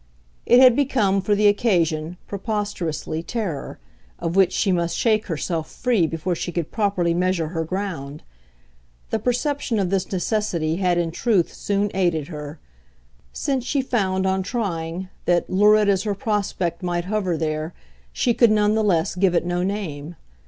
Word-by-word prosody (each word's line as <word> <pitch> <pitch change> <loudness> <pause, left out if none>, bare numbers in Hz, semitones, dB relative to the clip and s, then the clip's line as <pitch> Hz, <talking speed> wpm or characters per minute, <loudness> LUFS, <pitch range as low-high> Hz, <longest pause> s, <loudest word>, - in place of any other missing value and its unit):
It 245 - +7
had 255 -2 +7
become, 230 -9 +2
for 205 +2 +1
the 210 +1 +4
occasion, 175 -6 +1
preposterously, 200 -7 -3
terror 175 - -4 0.4
of 165 +1 -3
which 195 -2 +4
she 195 - +1
must 170 -1 0
shake 220 -1 +2
herself 165 -1 -3
free 230 -10 +1
before 165 +3 -2
she 175 +1 -4
could 170 -3 -3
properly 195 -6 +1
measure 175 -2 0
her 165 -1 -2
ground. 160 -5 -5 0.9
The - - +1
perception 250 -1 -1
of 190 -3 0
this 195 -1 -1
necessity 180 -5 -1
had 180 -2 +1
in 170 -1 0
truth 195 -1 +1
soon 205 0 -1
aided 170 -5 0
her; 150 -1 -7 0.7
since 265 - -1
she 270 +2 0
found, 190 -7 0
on 190 0 +1
trying, 185 -5 -3 0.2
that, 175 -1 +1
lurid 210 +2 +5
as 195 -2 +3
her 205 -1 -2
prospect 195 -5 -2
might 175 -1 -2
hover 190 -4 -1
there, 155 +1 -2 0.4
she 240 - +1
could 235 0 +5
none 210 0 +3
the 220 0 +1
less 170 -6 +1
give 180 0 +2
it 170 - +1
no 175 0 -1
name. 175 -5 -4
185 Hz, 160 wpm, -22 LUFS, 170-210 Hz, 0.9 s, It